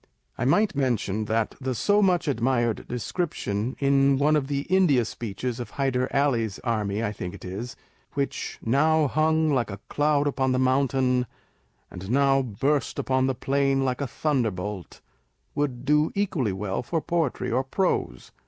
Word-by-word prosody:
I 120 Hz, -, -2 dB
might 205 Hz, +11 st, +3 dB
mention 110 Hz, -6 st, 0 dB
that 110 Hz, +1 st, 0 dB
the 130 Hz, -1 st, -2 dB
so 205 Hz, -, +3 dB
much 180 Hz, -4 st, +2 dB
admired 120 Hz, -3 st, 0 dB
description 125 Hz, -, -3 dB
in 140 Hz, 0 st, +3 dB
one 150 Hz, +3 st, +3 dB
of 145 Hz, -3 st, 0 dB
the 140 Hz, -1 st, -1 dB
India 160 Hz, -8 st, +3 dB
speeches, 115 Hz, +3 st, -5 dB
of 120 Hz, -, -5 dB
Hyder 130 Hz, -2 st, 0 dB
Ally's 120 Hz, -7 st, +1 dB
army 110 Hz, -3 st, -1 dB
(I 110 Hz, -, -1 dB
think 90 Hz, -2 st, -6 dB
it 100 Hz, -, -11 dB
is) 105 Hz, +8 st, -6 dB, 0.4 s
which 140 Hz, -1 st, -3 dB
u 115 Hz, -, -1 dB
now 155 Hz, +3 st, +4 dB
hung 155 Hz, +2 st, +2 dB
like 125 Hz, -5 st, +1 dB
a 100 Hz, -1 st, -7 dB
cloud 145 Hz, 0 st, +2 dB
upon 135 Hz, -2 st, +1 dB
the -, -, +1 dB
moun 130 Hz, +2 st, +3 dB
tain, 125 Hz, -1 st, +1 dB, 0.6 s
and 95 Hz, +2 st, -8 dB
now 135 Hz, +1 st, +3 dB
burst 130 Hz, +4 st, -1 dB
upon 130 Hz, 0 st, +1 dB
the 135 Hz, -, 0 dB
plain 135 Hz, +1 st, +1 dB
like 130 Hz, +1 st, -1 dB
a 140 Hz, -, -1 dB
thunderbolt," 105 Hz, -, -2 dB, 0.5 s
would 135 Hz, -4 st, -2 dB
do 150 Hz, +2 st, +3 dB
equally 170 Hz, -, 0 dB
well 95 Hz, 0 st, -3 dB
for 165 Hz, +7 st, -2 dB
poetry 165 Hz, -4 st, -1 dB
or 130 Hz, +3 st, +1 dB
prose. 180 Hz, +8 st, -1 dB
130 Hz, 165 wpm, -25 LUFS, 115-145 Hz, 0.6 s, now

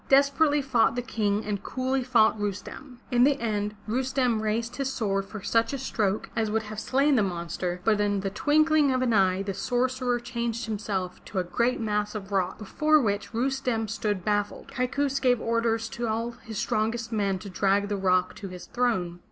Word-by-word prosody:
Desperately 280 Hz, +2 st, +4 dB
fought 245 Hz, -4 st, +2 dB
the 245 Hz, -, -1 dB
King 215 Hz, -4 st, -1 dB
and 205 Hz, -2 st, -2 dB
coolly 260 Hz, 0 st, -1 dB
fought 235 Hz, -4 st, +4 dB
Rustem. 210 Hz, +6 st, -5 dB
In 245 Hz, 0 st, +4 dB
the 285 Hz, +1 st, +3 dB
end, 210 Hz, -2 st, -2 dB
Rustem 250 Hz, -1 st, +1 dB
raised 225 Hz, +3 st, -2 dB
his 275 Hz, -1 st, -1 dB
sword 195 Hz, -6 st, -1 dB
for 205 Hz, 0 st, -9 dB
such 230 Hz, +2 st, +1 dB
a -, -, -1 dB
stroke 215 Hz, -6 st, -1 dB
as 225 Hz, -2 st, 0 dB
would 220 Hz, +1 st, 0 dB
have 215 Hz, 0 st, -6 dB
slain 275 Hz, +5 st, +2 dB
the 235 Hz, -, +4 dB
monster, 175 Hz, -1 st, -3 dB
but 210 Hz, -1 st, +3 dB
in 205 Hz, -1 st, +1 dB
the 195 Hz, 0 st, -2 dB
twinkling 300 Hz, +5 st, +3 dB
of 255 Hz, 0 st, +1 dB
an 240 Hz, -2 st, +1 dB
eye 190 Hz, -2 st, +3 dB
the 195 Hz, 0 st, -3 dB
sorcerer 250 Hz, +2 st, 0 dB
changed 235 Hz, -1 st, -3 dB
himself 200 Hz, -4 st, -3 dB
to 200 Hz, -, -7 dB
a 185 Hz, -, +2 dB
great 235 Hz, +8 st, 0 dB
mass 210 Hz, -1 st, -1 dB
of 200 Hz, -1 st, -6 dB
rock, 190 Hz, -2 st, 0 dB
before 305 Hz, +9 st, +2 dB
which 205 Hz, -6 st, -1 dB
Rustem 245 Hz, -2 st, -1 dB
stood 205 Hz, -3 st, -2 dB
baffled. 205 Hz, +5 st, -1 dB
Kaikous 275 Hz, +1 st, -1 dB
gave 250 Hz, -3 st, +3 dB
orders 230 Hz, 0 st, 0 dB
to 230 Hz, 0 st, -2 dB
his 220 Hz, -3 st, -6 dB
strongest 225 Hz, +3 st, -1 dB
men 200 Hz, -3 st, 0 dB
to 200 Hz, -, -9 dB
drag 200 Hz, +1 st, +1 dB
the 205 Hz, -, -1 dB
rock 185 Hz, -1 st, +2 dB
to 200 Hz, -, -6 dB
his 180 Hz, -1 st, -9 dB
throne. 190 Hz, -9 st, -1 dB
225 Hz, 190 wpm, -27 LUFS, 205-255 Hz, -, Desperately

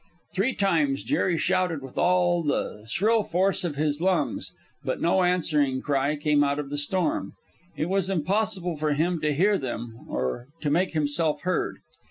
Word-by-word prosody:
Three 200 Hz, +8 st, 0 dB
times 275 Hz, +8 st, +1 dB
Jerry 190 Hz, -, +1 dB
shouted 180 Hz, -5 st, 0 dB
with 135 Hz, -, -10 dB
all 175 Hz, -1 st, +3 dB
the 110 Hz, -8 st, -2 dB
shrill 220 Hz, -, +2 dB
force 190 Hz, +2 st, 0 dB
of 165 Hz, -5 st, -2 dB
his 150 Hz, +1 st, -1 dB
lungs, 185 Hz, -2 st, 0 dB, 0.3 s
but -, -, -2 dB
no 180 Hz, +3 st, +3 dB
answering 155 Hz, -7 st, +2 dB
cry 140 Hz, +1 st, 0 dB
came 150 Hz, 0 st, +2 dB
out 140 Hz, 0 st, +1 dB
of 145 Hz, -1 st, -5 dB
the 145 Hz, -, -2 dB
storm. 175 Hz, +4 st, 0 dB, 0.4 s
It 155 Hz, -, 0 dB
was 190 Hz, 0 st, 0 dB
impossible 190 Hz, -1 st, 0 dB
for 150 Hz, 0 st, 0 dB
him 165 Hz, +3 st, 0 dB
to 150 Hz, -1 st, +1 dB
hear 195 Hz, +7 st, +3 dB
them 120 Hz, -3 st, -6 dB
or 65 Hz, -, -2 dB
to 150 Hz, -, 0 dB
make 180 Hz, +4 st, +1 dB
himself 150 Hz, 0 st, 0 dB
heard. 185 Hz, -, -1 dB
165 Hz, 170 wpm, -26 LUFS, 145-185 Hz, 0.4 s, all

